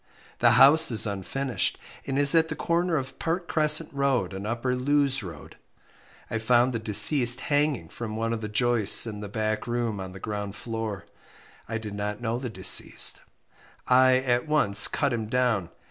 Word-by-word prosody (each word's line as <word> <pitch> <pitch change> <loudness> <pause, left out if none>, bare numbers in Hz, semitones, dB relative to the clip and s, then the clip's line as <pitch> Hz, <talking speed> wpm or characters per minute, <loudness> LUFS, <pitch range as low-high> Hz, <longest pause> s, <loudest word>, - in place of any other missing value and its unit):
The - - +3
house 155 +4 +6
is 110 -3 +2
unfinished, 110 +4 -3 0.3
and 135 - -3
is 145 0 +6
at 165 -1 +2
the 160 - -5
corner 170 +1 -1
of 135 -1 -7
Park 170 +1 -4
Crescent 155 0 +1
Road 135 -9 -1
and 95 +2 -7
Upper 120 +3 -3
Lewes 135 0 0
Road. 85 -7 -12 0.7
I 115 - -4
found 120 +3 +1
the 115 - -3
deceased 120 +3 +6
hanging 145 - -2
from 110 +4 -8
one 115 +1 -3
of 115 - -5
the 105 - -6
joists 120 -1 +3
in 105 -3 -7
the 105 -1 -8
back 110 +2 -4
room 120 -3 -3
on 95 -1 -8
the 95 - -11
ground 105 0 -6
floor. 115 -4 -7 0.6
I 115 - -3
did 110 -2 -8
not 105 +1 -5
know 120 0 -4
the 125 -1 -6
deceased. 95 -4 +2 0.7
I 130 0 +4
at 125 +1 -2
once 110 -9 +4
cut 140 -4 -2
him 110 -2 -4
down. 115 -6 -1
120 Hz, 175 wpm, -24 LUFS, 105-135 Hz, 0.7 s, house